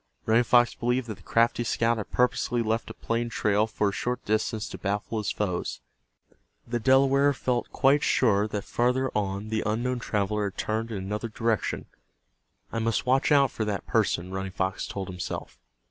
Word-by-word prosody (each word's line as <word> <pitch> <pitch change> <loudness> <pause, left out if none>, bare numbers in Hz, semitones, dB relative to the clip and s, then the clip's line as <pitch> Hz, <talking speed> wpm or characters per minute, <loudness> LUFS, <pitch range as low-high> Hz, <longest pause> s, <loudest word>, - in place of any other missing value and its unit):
Running 115 +2 +4
Fox 120 +1 +4
believed 125 +1 0
that 105 - -5
the - - -19
crafty 115 +1 +2
scout 115 0 +1
had 110 - -5
purposely 125 -1 +1
left 110 +1 -1
a - - -8
plain 115 +1 -2
trail 105 -1 +1
for 105 -2 0
a - - -3
short 125 +5 -3
distance 110 0 0
to - - -8
baffle 105 +3 -2
his 105 - -2
foes. 90 -4 -2 0.9
The 120 0 -2
Delaware 135 +3 +4
felt 125 -2 -2
quite 140 +1 +3
sure 105 -7 +3
that 105 -2 -4
farther 125 +2 0
on 100 0 -2
the 110 0 0
unknown 120 +4 -1
traveler 105 -2 -1
had - - -20
turned 110 +1 -2
in 110 - -4
another 105 +4 -4
direction. 115 0 -1 0.9
"I 115 - -2
must 115 -1 0
watch 130 +4 +2
out 140 -3 +5
for 110 - -3
that 105 -2 -3
person," 90 +2 0
Running 95 0 -4
Fox 95 +1 -2
told 95 -2 -5
himself. 90 -1 -6
110 Hz, 180 wpm, -27 LUFS, 105-120 Hz, 0.9 s, out